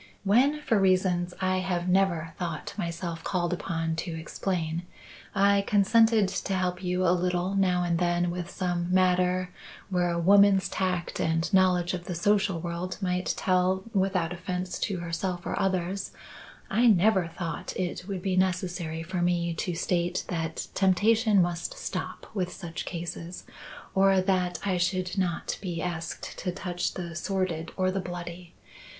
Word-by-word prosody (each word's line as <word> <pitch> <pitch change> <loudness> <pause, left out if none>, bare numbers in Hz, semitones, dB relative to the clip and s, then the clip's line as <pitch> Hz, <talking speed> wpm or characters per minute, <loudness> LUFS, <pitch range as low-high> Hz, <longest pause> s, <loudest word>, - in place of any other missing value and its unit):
"When, 260 +9 +3
for 225 -7 +2
reasons 185 -2 +2
I 185 0 +2
have 180 -1 -1
never 180 -4 +2
thought 170 -3 -4
myself 170 -3 -4
called 175 -2 0
upon 165 -2 -2
to 165 0 -3
explain, 165 -1 -2 0.5
I 200 0 +4
consented 220 +1 +4
to 195 0 -2
help 180 0 -1
you 180 +1 0
a 170 - +5
little 180 +1 0
now 185 -2 +2
and 170 -1 0
then 175 0 +1
with 175 0 -4
some 175 -2 -2
matter 180 0 +2 0.4
where 180 -1 +2
a 170 - -1
woman's 195 +2 +5
tact 180 -3 -2
and 165 +4 0
knowledge 185 -2 +3
of 175 -1 -4
the 180 - -4
social 200 0 +2
world 175 +2 -4
might 180 -2 -1
tell 185 0 +2
without 190 -3 +1
offence 180 +1 -4
to 195 - -1
herself 175 +2 -3
or - - -2
others, 185 0 -1 0.6
I 240 +2 +3
never 195 -3 +4
thought 170 0 -5
it 180 0 -3
would 190 -3 -4
be 190 -2 0
necessary 180 -3 -1
for 180 +1 -3
me 175 -1 +1
to 170 +1 -3
state 175 +1 0
that 165 -2 -2
temptation 205 +1 +4
must 175 -1 -3
stop - - -5
with 185 -4 -1
such 170 -3 -6
cases, 170 0 -6 0.5
or 195 0 +4
that 185 -2 +1
I 190 -2 +1
should 180 0 0
not 175 -3 -1
be 175 -4 -3
asked 165 -1 -4
to 180 - -2
touch 180 -1 -3
the 170 -2 -5
sordid 170 -2 -2
or 185 -1 +2
the 195 +1 -1
bloody. 175 -1 -7
180 Hz, 155 wpm, -28 LUFS, 175-190 Hz, 0.6 s, a